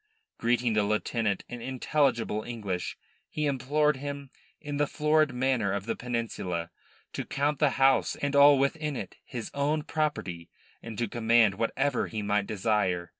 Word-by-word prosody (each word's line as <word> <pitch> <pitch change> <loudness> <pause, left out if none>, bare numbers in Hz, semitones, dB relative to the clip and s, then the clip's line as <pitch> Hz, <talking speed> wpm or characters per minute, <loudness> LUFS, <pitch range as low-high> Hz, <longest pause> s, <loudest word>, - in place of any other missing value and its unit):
Greeting 120 0 +1
the 105 - +3
lieutenant 105 0 0
in 120 -1 -7
intelligible 130 -4 0
English, 105 -7 -4 0.3
he 150 - -2
implored 145 +2 +1
him, 140 0 -6 0.3
in 145 -2 -5
the 145 0 +2
florid 155 0 +2
manner 125 -5 +1
of 100 0 -2
the 115 - -2
Peninsula, 115 -8 -3 0.4
to - - -3
count 145 +1 -1
the 150 - +4
house 135 0 +4
and 145 0 -2
all 140 0 +8
within 150 +2 0
it 95 -7 -6
his 120 -4 -6
own 145 +2 0
property, 145 - -2 0.3
and 115 -2 -8
to 120 - 0
command 115 -1 +3
whatever 120 +6 0
he 110 -2 -4
might 100 0 0
desire. 95 -5 0
120 Hz, 155 wpm, -28 LUFS, 105-145 Hz, 0.4 s, all